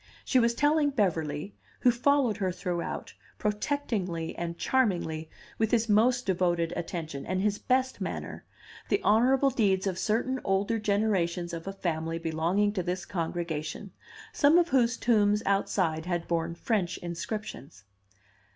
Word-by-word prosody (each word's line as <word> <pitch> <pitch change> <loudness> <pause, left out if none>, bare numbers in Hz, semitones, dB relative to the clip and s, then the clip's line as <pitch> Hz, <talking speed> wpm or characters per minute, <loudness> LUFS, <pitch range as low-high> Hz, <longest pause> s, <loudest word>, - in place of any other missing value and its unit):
She 260 - +3
was 235 0 +2
telling 295 +2 +3
Beverly 180 - -1 0.3
(who 245 - +6
followed 250 -2 +2
her 190 -3 0
throughout, 175 -1 -4 0.2
protectingly 210 - -2
and 170 0 -4
charmingly, 175 -11 0 0.3
with 220 -1 +2
his 230 -1 +2
most 240 +4 +3
devoted 175 -3 +1
attention 160 -5 -4
and 185 0 -2
his 205 +1 0
best 260 +1 0
manner) - - -5 0.5
the - - +2
honorable 260 +6 +4
deeds 195 -6 +1
of 185 -2 -2
certain 250 +4 0
older 200 +4 +1
generations 195 -5 0
of 165 +2 -6
a - - -2
family 165 -3 -2
belonging 165 +6 0
to 190 - -1
this 180 0 -3
congregation, 170 0 -4 0.4
some 295 -1 +5
of 350 -1 +3
whose 245 -3 +2
tombs 210 -2 +2
outside 180 -4 0
had 175 -2 -2
borne 170 0 -1
French 185 -2 -1
inscriptions. 170 - -6
195 Hz, 140 wpm, -28 LUFS, 170-230 Hz, 0.5 s, who